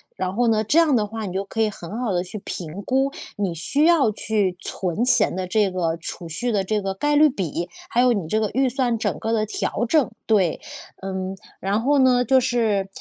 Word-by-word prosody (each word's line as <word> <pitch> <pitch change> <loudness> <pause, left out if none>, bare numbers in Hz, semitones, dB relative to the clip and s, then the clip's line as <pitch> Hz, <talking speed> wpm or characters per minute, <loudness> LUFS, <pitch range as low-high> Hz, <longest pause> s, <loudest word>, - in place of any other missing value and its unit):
然 185 0 -3
后 240 +2 +2
呢， 215 -1 +2
这 290 - +2
样 330 -3 +5
的 210 -3 +1
话 220 0 -5
你 185 - -5
就 190 +1 -1
可 225 - -3
以 220 - +3
很 200 +1 -8
好 245 -4 -1
地 175 -1 +1
去 190 +4 -7
评 175 0 -6
估， 265 +5 +1 0.3
你 190 -5 -1
需 280 - +2
要 320 -9 +4
去 205 -3 -1
存 190 +2 -2
钱 250 -1 +4
的 185 0 -3
这 200 0 +1
个 170 -3 -1
储 170 +1 -6
蓄 240 +10 -2
的 200 -3 +1
这 210 +2 -1
个 195 -1 -2
概 295 +10 0
率 305 +1 +7
比， 175 - -3 0.2
还 240 - +2
有 250 -1 +4
你 195 -7 -3
这 215 +7 0
个 215 -1 0
预 265 0 +2
算 245 -2 0
整 205 -8 -2
个 225 - -2
的 220 -1 +1
调 225 +2 -2
整， 300 +1 +2
对。 195 -7 +2 0.4
嗯， 190 0 -4 0.2
然 200 +3 0
后 285 +4 +2
呢， 250 -2 +4
就 260 +2 +4
是 220 -6 +1
215 Hz, 245 characters per minute, -22 LUFS, 190-245 Hz, 0.4 s, 率